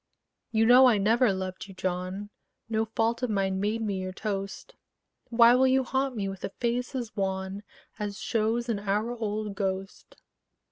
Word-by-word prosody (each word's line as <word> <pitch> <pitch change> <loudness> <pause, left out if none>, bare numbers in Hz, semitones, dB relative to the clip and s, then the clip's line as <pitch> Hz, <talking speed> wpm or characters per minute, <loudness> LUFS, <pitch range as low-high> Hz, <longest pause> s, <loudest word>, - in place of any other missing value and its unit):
You 225 -1 +2
know 250 +3 +8
I 235 -4 +4
never 225 +3 +3
loved 190 0 -4
you, 195 - -12
John; 185 +3 -3 0.4
No 220 -1 0
fault 225 +2 0
of 250 - 0
mine 195 -2 0
made 215 +3 -1
me 200 -3 -2
your 185 0 -4
toast: 195 0 -5 0.6
Why 235 0 +6
will 260 +1 +4
you 260 0 +3
haunt 265 +1 -1
me 200 -3 -2
with 195 -1 -7
a - - -2
face 245 +5 -2
as 240 -4 -4
wan 190 0 -2 0.4
As 205 -1 -3
shows 230 +1 0
an 225 -4 -1
hour 210 +4 -1
old 215 -2 -3
ghost? 195 -1 -4
215 Hz, 175 wpm, -28 LUFS, 195-235 Hz, 0.6 s, know